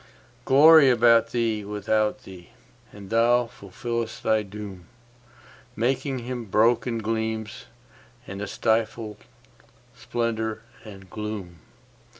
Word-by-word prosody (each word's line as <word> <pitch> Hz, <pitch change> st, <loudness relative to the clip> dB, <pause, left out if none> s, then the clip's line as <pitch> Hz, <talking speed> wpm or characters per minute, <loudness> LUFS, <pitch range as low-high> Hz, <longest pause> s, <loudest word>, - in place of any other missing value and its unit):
Glory 150 Hz, +1 st, +7 dB
about 115 Hz, -2 st, +5 dB
thee, 115 Hz, -3 st, -1 dB
without 105 Hz, +4 st, -1 dB
thee; 90 Hz, -4 st, -13 dB, 0.4 s
and 100 Hz, -1 st, -12 dB
thou 120 Hz, +2 st, +3 dB
fulfillest 115 Hz, +2 st, -6 dB
thy 110 Hz, 0 st, +2 dB
doom, 100 Hz, -3 st, -9 dB, 0.9 s
Making 130 Hz, +3 st, -1 dB
Him 125 Hz, -2 st, -5 dB
broken 115 Hz, +3 st, +2 dB
gleams, 110 Hz, -1 st, -3 dB, 0.6 s
and 100 Hz, -2 st, -7 dB
a 105 Hz, -, -4 dB
stifled 110 Hz, 0 st, -1 dB, 0.8 s
splendour 110 Hz, -2 st, -3 dB, 0.2 s
and 95 Hz, -3 st, -12 dB
gloom. 100 Hz, -5 st, -7 dB
110 Hz, 100 wpm, -25 LUFS, 105-120 Hz, 0.9 s, Glory